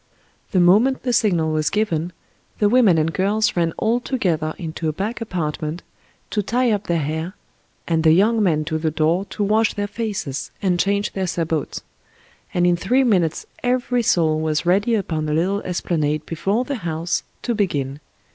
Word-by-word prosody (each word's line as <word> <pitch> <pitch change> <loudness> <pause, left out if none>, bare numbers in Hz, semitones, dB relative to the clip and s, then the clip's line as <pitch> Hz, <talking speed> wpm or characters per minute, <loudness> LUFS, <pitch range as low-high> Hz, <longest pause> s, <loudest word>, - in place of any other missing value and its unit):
The 190 - +1
moment 210 +10 +4
the 245 - 0
signal 175 -9 +2
was 155 0 +1
given, 175 -5 -1 0.5
the 210 - +3
women 225 -8 +5
and 160 +1 +1
girls 205 +3 +1
ran 170 -2 +1
all 230 +2 +1
together 170 - -1
into 160 -1 -3
a - - 0
back 205 +9 -4
apartment 160 -5 -3 0.5
to 210 - +1
tie 245 +4 +1
up 205 -1 -1
their 170 - +1
hair, 160 +6 -3 0.5
and 165 -1 +1
the 160 - +6
young 215 +7 +4
men 155 -6 +2
to 160 0 -2
the 160 0 0
door 160 +5 +1
to 205 +2 -4
wash 215 +2 +2
their 205 - -1
faces 205 - -4
and 180 -3 0
change 200 +2 0
their 190 -1 -2
sabots, 165 -4 -2 0.7
and 175 0 +1
in 175 0 +4
three 255 +9 +2
minutes 180 -10 +1 0.2
every 245 0 +1
soul 165 -8 +2
was 155 0 -1
ready 200 +6 +3
upon 160 -7 -2
a - - 0
little 190 +6 +1
esplanade 155 -4 -1
before 195 +9 -1
the 280 +1 -3
house 170 -3 -2 0.2
to 240 - 0
begin. 145 -10 -1
180 Hz, 175 wpm, -21 LUFS, 160-215 Hz, 0.7 s, the